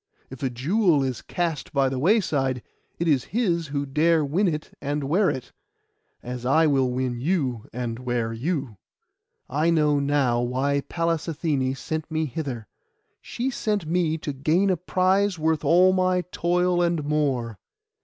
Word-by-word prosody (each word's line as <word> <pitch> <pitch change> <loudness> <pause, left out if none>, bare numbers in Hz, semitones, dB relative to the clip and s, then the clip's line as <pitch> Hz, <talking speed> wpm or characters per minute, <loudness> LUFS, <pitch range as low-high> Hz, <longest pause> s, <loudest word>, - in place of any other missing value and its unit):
If 130 - -9
a 135 - 0
jewel 155 - +2
is 130 -3 -3
cast 170 -5 -3
by 140 -1 +3
the 130 -1 -2
wayside, 140 - +1 0.3
it 170 - -1
is 140 -6 +2
his 170 -9 +1
who 140 0 -2
dare 155 +3 +2
win 180 +8 +1
it 155 -3 -3
and 145 +1 -2
wear 180 +8 +2
it, 130 - -5 0.7
as 125 0 -6
I 145 +6 +4
will 135 -4 +2
win 125 -1 -2
you 135 - -1
and 120 -1 -4
will 125 - -12
wear 120 -2 -1
you. 135 - -3 0.7
I 150 +5 +1
know 150 -3 +3
now 140 -4 +1
why 135 +4 0
Pallas 165 -1 -1
Athené 145 -5 -1
sent 155 +1 -4
me 160 0 -1
hither. 130 -5 -5 0.6
She 255 +3 -3
sent 210 -7 -1
me 165 -1 0
to 150 -2 -5
gain 160 +8 +2
a 180 - +1
prize 185 +2 +1
worth 160 -1 0
all 185 +2 +5
my 185 -1 +2
toil 180 +1 +1
and 170 -3 +1
more. 135 -7 -1
150 Hz, 165 wpm, -24 LUFS, 130-170 Hz, 0.7 s, all